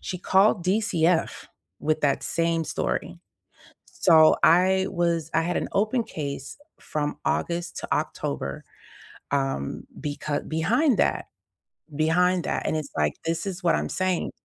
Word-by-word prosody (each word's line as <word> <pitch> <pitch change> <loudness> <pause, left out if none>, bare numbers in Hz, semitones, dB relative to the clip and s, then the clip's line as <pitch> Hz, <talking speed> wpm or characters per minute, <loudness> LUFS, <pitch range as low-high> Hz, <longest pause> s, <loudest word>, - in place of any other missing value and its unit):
She 180 - -5
called 190 +1 +3
DCF 180 -4 +1 0.3
with 155 +1 0
that 140 -2 +1
same 165 0 0
story. - - -3 0.7
So, 160 -1 +5
I 190 +3 +4
was 170 -3 -1
I 165 - +3
had 175 +2 -1
an - - -3
open 220 +4 +1
case 140 -7 -6 0.2
from 150 -1 -3
August 170 0 -2
to - - -3
October, 70 -1 -3 0.7
um, 135 - -2 0.2
becau 145 0 -3
behind 225 - +2
that - - +1 0.7
behind 175 +4 +2
that. - - -2
And - - 0
it's 150 -2 -5
like, 75 -1 +1
this 165 +1 -1
is 195 -1 -5
what 170 - +3
I'm - - -2
saying. 185 -2 -1
165 Hz, 135 wpm, -25 LUFS, 155-185 Hz, 0.7 s, So